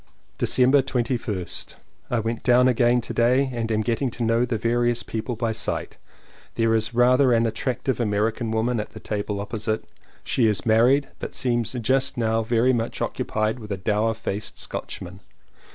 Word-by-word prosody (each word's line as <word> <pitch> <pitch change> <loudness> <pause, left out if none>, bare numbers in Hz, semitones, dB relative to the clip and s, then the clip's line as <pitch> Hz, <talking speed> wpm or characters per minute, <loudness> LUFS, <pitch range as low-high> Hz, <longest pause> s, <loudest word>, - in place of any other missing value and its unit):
December 130 +2 +4
21st. 120 -7 -3 0.3
I 120 - +1
went 115 +1 -3
down 125 0 +4
again 120 0 +3
to - - -6
day 130 +3 +2
and 115 -1 -2
am 110 0 +1
getting 120 +4 0
to 120 +1 -5
know 115 +2 +2
the 120 -2 -2
various 120 +1 +1
people 115 +2 -4
by 115 0 -1
sight. 110 -1 -3 0.6
There 115 0 +2
is 110 +1 0
rather 125 +2 +5
an 115 -1 +3
attractive 125 +2 -2
American 110 +1 0
woman 115 +2 0
at 105 - -6
the - - -9
table 105 -1 -3
opposite; 110 +1 -3 0.4
she 120 -4 +2
is 105 -3 0
married, 125 +5 +4
but - - -6
seems 120 -3 0
just 130 +3 0
now 115 -1 +1
very 120 +3 +2
much 115 -1 -2
occupied 110 +3 -1
with 105 -2 -9
a 100 - -1
dour 105 +3 0
faced 105 -2 -5
Scotchman. 90 +1 -6
115 Hz, 170 wpm, -24 LUFS, 110-125 Hz, 0.6 s, rather